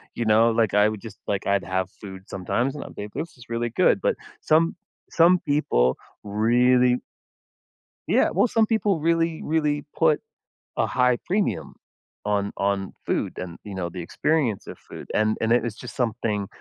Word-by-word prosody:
you 120 - -1
know? 110 +2 +5
Like, 115 -3 +1
I 105 +1 +5
would 110 -2 -4
just 110 -3 -10
like, 100 -1 -1
I'd 100 -1 +1
have 95 0 -1
food 95 -2 -9
sometimes, 120 +9 -1
and 145 - -5
I'd - - -11
be - - -5
like, 105 - -9
"This 155 -1 -5
is 125 - -15
really 115 0 -1
good." - - +3
But - - +1 0.3
some 165 +2 +3 0.4
some 175 +2 +5
people 65 - +1 0.3
really 125 +4 +3 1.1
yeah, - - +3
well, 200 +7 +3
some 225 -2 +3
people 210 -6 +1
really, 165 0 +1
really 150 -2 0
put 160 -2 +3 0.6
a - - +3
high 125 -1 +2
premium 175 - -1 0.5
on 100 -1 0
on 100 -1 -1
food - - -1
and, 85 -2 -6
you 105 -2 -8
know, 90 -2 -3
the 90 +1 -7
experience 125 - 0
of - - -8
food, - - -11
and 110 0 +2
and 115 - 0
it 120 - +3
it's 115 -3 -3
just 125 - -9
something- 110 -4 -1
115 Hz, 180 wpm, -24 LUFS, 100-150 Hz, 1.1 s, know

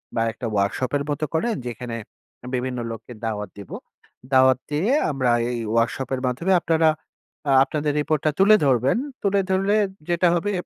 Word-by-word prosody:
বা 115 - +1
একটা 120 - -7
ওয়ার্কশপ 100 +5 0
এর 140 - -3
মত 145 - -2
করেন 230 +8 +1
যেখানে 120 0 -5 0.6
বিভিন্ন 125 0 -3
লোককে 115 +2 -9
দাওয়াত 105 -3 -3
দিবো। 100 - -8 0.6
দাওয়াত 130 0 +5
দিয়ে 175 - +1 0.2
আমরা 130 -3 +1 0.2
এই 120 - -3
ওয়ার্কশপ 115 +3 0
এর 130 - -6
মাধ্যমে 170 +10 0
আপনারা 160 -1 +3 0.6
আ - - +4
আপনাদের 150 0 -2
রিপোর্টটা 155 0 0
তুলে 210 +2 +7
ধরবেন। 130 - +2 0.3
তুলে 200 0 +2
ধরলে 195 +3 +2 0.3
যেটা 175 +1 +3
হবে 205 +5 -1
135 Hz, 160 wpm, -23 LUFS, 120-170 Hz, 0.6 s, তুলে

